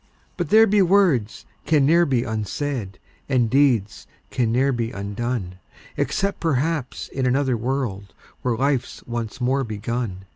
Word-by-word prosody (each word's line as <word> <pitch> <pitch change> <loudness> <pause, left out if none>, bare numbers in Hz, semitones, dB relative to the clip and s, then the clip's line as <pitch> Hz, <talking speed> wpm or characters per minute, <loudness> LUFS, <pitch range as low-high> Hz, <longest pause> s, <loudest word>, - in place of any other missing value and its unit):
But - - -3
there 220 +1 +7
be 210 -1 +3
words 175 - +2 0.2
can 150 -3 +4
ne'er 170 +4 +4
be 125 -4 +1
unsaid, 110 -1 -3 0.3
And 120 -5 +2
deeds 125 -7 +2 0.2
can 120 -3 0
ne'er 130 +4 +2
be 120 -3 -2
undone, 100 -2 -4 0.4
Except 200 0 -1
perhaps 155 -2 -1
in 130 -1 -1
another 130 0 +1
world, 115 -5 -3 0.3
Where 120 -3 -1
life's 135 -1 -1
once 120 0 -5
more 130 +2 +1
begun. 110 -3 -4
125 Hz, 140 wpm, -22 LUFS, 110-140 Hz, 0.4 s, there